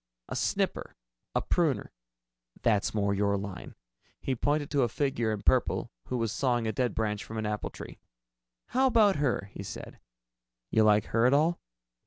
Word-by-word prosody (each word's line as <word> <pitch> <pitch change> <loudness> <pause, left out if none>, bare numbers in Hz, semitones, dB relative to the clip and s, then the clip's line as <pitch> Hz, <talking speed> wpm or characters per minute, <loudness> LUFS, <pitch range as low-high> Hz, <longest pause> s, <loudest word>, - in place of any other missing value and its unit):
A - - -5
snipper, - - -1 0.4
a - - +1
pruner - - +1 0.7
that's 110 -3 +2
more 100 -1 +1
your 100 0 +1
line." 100 -2 -7 0.4
He 135 - -1
pointed 145 +3 0
to 140 - +2
a 120 - +2
figure 120 -3 0
in 105 -2 -4
purple - - +2
who 125 - -2
was 115 -2 -1
sawing 120 -2 +1
a 110 - 0
dead 125 +3 -1
branch 105 -2 -1
from 110 - -7
an 110 - -2
apple 105 -1 -2
tree. - - -10 0.7
"How 260 +2 +3
about 215 - +4
her?" 120 -8 0
he - - -7
said. 100 - -8 0.7
"You 110 - +4
like 105 -1 +4
her 115 +2 +5
at 135 - +4
all?" 160 +4 +2
115 Hz, 175 wpm, -29 LUFS, 105-140 Hz, 0.7 s, her